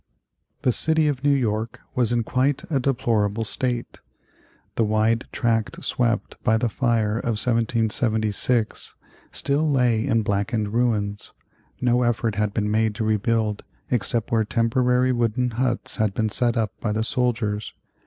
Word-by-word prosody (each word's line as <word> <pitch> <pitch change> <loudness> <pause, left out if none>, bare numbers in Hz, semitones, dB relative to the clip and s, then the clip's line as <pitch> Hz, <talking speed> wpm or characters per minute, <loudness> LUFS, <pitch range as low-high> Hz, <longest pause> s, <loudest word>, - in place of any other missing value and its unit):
The 125 - +3
city 160 +4 +4
of 140 -3 -2
New 145 - +3
York 115 -3 0
was 120 -3 +1
in 120 -1 +1
quite 135 +4 0
a 140 - +2
deplorable 115 -5 0
state. 120 +2 -2 0.7
The 115 - +1
wide 110 +2 +1
tract 115 -2 -1
swept 120 -1 0
by 110 -3 +3
the 120 +1 0
fire 115 -3 0
of 115 -3 -2
1776 115 0 0 0.4
still 150 +3 +1
lay 125 -5 +2
in 115 -4 +2
blackened 105 +1 -1
ruins. 105 -4 -1 0.5
No 125 0 +2
effort 120 -2 0
had 105 0 -1
been 105 0 -1
made 110 0 +1
to 110 - -2
rebuild 110 0 0 0.3
except 115 -1 0
where 115 -1 +3
temporary 125 +3 +1
wooden 120 0 0
huts 120 +1 -1
had 110 -4 0
been 110 -1 0
set 120 +2 +1
up 110 -4 0
by 110 - -1
the 110 +1 0
soldiers. 115 -3 -1
115 Hz, 145 wpm, -23 LUFS, 110-125 Hz, 0.7 s, city